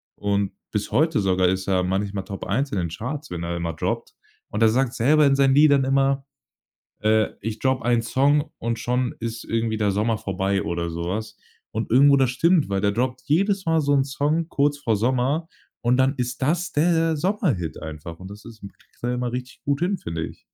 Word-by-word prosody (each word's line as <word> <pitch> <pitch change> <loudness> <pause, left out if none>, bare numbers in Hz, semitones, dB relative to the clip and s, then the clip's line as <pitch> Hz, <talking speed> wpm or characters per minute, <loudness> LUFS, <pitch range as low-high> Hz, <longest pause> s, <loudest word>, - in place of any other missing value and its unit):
Und 100 -1 -1 0.2
bis 105 -1 -3
heute 155 -4 +2
sogar 95 -1 +2
ist 95 +1 0
er 95 -1 +2
manchmal 95 +1 -2
Top 100 -2 -6
1 135 +9 -1
in - - -2
den 85 -2 -1
Charts, 130 - -6
wenn 85 - -4
er 85 - -3
dann 85 - -4
mal 85 -1 -2
droppt. - - -3 0.4
Und 105 - -3
er 110 - +6
sagt 125 +2 +1
selber 150 +6 +4
in 140 -1 +4
seinen 135 -1 +4
Liedern 145 -2 +5
immer: 135 0 +2 0.8
„Äh, 110 0 +3
ich 110 +1 -5
drop 130 -1 +1
einen 120 -1 +2
Song 140 +6 +2
und 115 0 -2
schon 125 +1 -1
ist 115 0 -5
irgendwie 115 -1 -1
der 105 -2 +1
Sommer 110 +2 0
vorbei“ 95 0 -1
oder 85 0 -3
so 85 +1 -4
was. 110 +5 -4 0.3
Und 110 0 -3
irgendwo, 140 +2 +6
das 130 -3 +3
stimmt, 165 - +2
weil 100 -1 0
der 100 - +2
droppt 125 +3 -2
jedes 195 +5 +1
Mal 160 -1 +3
so 145 -1 +1
'n 135 - +4
Song 150 +4 -1
kurz 145 -1 +1
vor 115 -7 0
Sommer 130 +8 0 0.3
und 120 +1 +2
dann 135 +2 +3
ist 125 -1 -3
das 170 +6 0
der 165 +1 +2
Sommerhit 150 - -1
einfach. 80 +1 -8
Und 95 +1 -10
das 105 +1 -11
ist 115 -2 -12
kriegt 100 - -15
er 120 +1 0
immer 125 -1 -2
richtig 125 +1 -6
gut 140 +1 0
hin, 185 +1 0
finde 85 - -4
ich. - - -12
120 Hz, 215 wpm, -23 LUFS, 100-140 Hz, 0.8 s, er